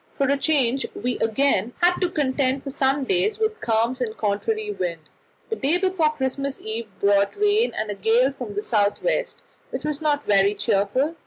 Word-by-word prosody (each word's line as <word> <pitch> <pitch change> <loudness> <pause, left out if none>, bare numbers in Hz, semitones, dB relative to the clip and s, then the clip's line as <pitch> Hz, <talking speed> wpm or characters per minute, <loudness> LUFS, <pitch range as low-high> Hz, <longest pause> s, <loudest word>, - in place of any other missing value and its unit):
For 275 - +2
a 280 - +3
change 275 -3 +1
we 245 +2 -2
again 230 -1 +1
had 355 +1 +4
to 360 - +2
contend 270 -4 0
for 275 - -5
some 270 +1 +1
days 195 -3 +1
with 440 0 -1
calms 230 +3 0
and 220 -3 -3
contrary 420 - -1
wind. 170 - -3 0.5
The 445 - -1
day 290 +6 +2
before 370 -4 +1
Christmas 275 -1 -3
Eve 220 +1 -4
brought 200 0 +2
rain 420 +3 +2
and 215 -1 -2
a - - -2
gale 230 +6 +2
from 245 -7 -7
the 205 - -2
south 205 -3 0
west, - - -1 0.3
which - - -5
was 300 0 -3
not 295 -2 0
very 200 0 +3
cheerful. 210 +9 0
265 Hz, 185 wpm, -23 LUFS, 215-300 Hz, 0.5 s, had